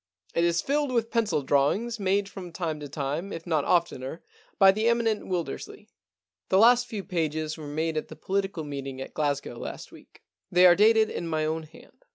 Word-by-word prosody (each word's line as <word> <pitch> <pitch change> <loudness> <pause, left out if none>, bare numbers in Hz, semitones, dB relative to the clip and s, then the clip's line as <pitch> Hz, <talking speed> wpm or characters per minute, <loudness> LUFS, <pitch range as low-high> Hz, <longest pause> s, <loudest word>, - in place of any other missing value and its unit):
It 170 - +1
is 170 0 +2
filled 290 0 0
with 230 -2 0
pencil 215 - +1
drawings 190 - +1
made 195 0 +1
from 185 -3 -9
time 165 -3 -3
to 145 -1 -7
time, 150 +7 -3
if 165 - -7
not 155 -5 0
oftener, 165 -3 0 0.3
by 195 -1 +7
the 215 +3 0
eminent 230 -2 +1
Wilder 170 -6 -2
sley. - - -12 0.6
The 190 - +4
last 240 +3 +6
few 210 -3 -5
pages 160 -4 -2
were 155 -2 -9
made 160 +2 -2
at 155 - -3
the - - -10
political 195 -3 -2
meeting 135 -2 -6
at 135 - -7
Glasgow 140 -5 -2
last - - -7
week. - - -17 0.3
They 180 +1 +6
are 175 - +9
dated 220 +2 +4
in 170 - -4
my 155 -1 0
own 160 +1 -1
hand. 160 - -17
170 Hz, 200 wpm, -27 LUFS, 155-205 Hz, 0.6 s, are